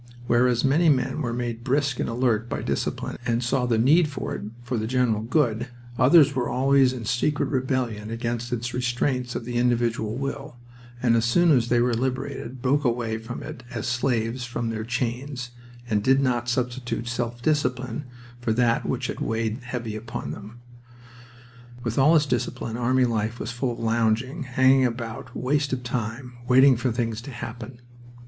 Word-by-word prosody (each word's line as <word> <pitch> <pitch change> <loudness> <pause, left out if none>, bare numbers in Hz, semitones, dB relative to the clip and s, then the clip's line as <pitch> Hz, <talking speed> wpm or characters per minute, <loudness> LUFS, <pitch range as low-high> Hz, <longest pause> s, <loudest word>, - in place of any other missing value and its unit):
Whereas 120 +1 +3
many 160 +5 +4
men 140 +2 +1
were 120 -5 -1
made 120 -1 -3
brisk 135 0 0
and - - -1
alert 115 -1 0
by - - -3
discipline - - -2
and 120 0 0
saw 125 +1 +1
the 115 -2 +2
need 150 +9 +5
of 145 - -10 0.2
it 105 - -6
for 120 +1 -3
the 110 - -2
general 120 -3 +1
good, 120 -1 +1 0.3
others 145 +2 +6
were 125 -2 -1
always 135 0 +4
in 125 -3 -6
secret 125 +6 0
rebellion 130 -5 -1
against 115 +1 -3
its 120 0 -2
restraints 125 0 -1
of - - -4
the 120 0 -3
individual 120 -2 +1
will, 140 0 -4 0.5
and 120 -2 +4
as 115 0 +2
soon 170 +8 +4
as 125 -5 +4
they 120 - +3
were 120 0 +2
liberated 130 0 -3
broke 140 +3 +2
away 115 -3 0
from 115 +2 -7
it - - -8
as 115 -3 -4
slaves 120 0 0
from 120 -1 -3
their 110 -1 -3
chains, 125 +2 -3 0.4
and 105 -3 +1
did 135 +3 +4
not 120 -3 0
substitute 120 -1 -2
self 120 0 -3
discipline 130 -4 0 0.3
for 120 -2 0
that 115 0 +2
which - - -1
had - - -4
weighed 115 +1 -1
heavy 120 -3 -5
on 115 +2 -6
them. 110 +3 -10 1.2
With 115 +2 -1
all 150 +5 +6
its 150 -2 +4
discipline, 120 -3 -2
army 125 +2 +2
life 115 0 -1
was 110 - -4
full 120 +1 -2
of - - -9
lounging, 115 +6 0
hanging 130 +1 +4
about, 115 -2 -3
waste 140 +2 0
of 125 -1 -2
time, 125 +1 -4
waiting 130 +1 +7
for 125 +1 -1
things 115 -1 -2
to 135 - -9
happen. 120 -1 -7
120 Hz, 175 wpm, -25 LUFS, 115-130 Hz, 1.2 s, waiting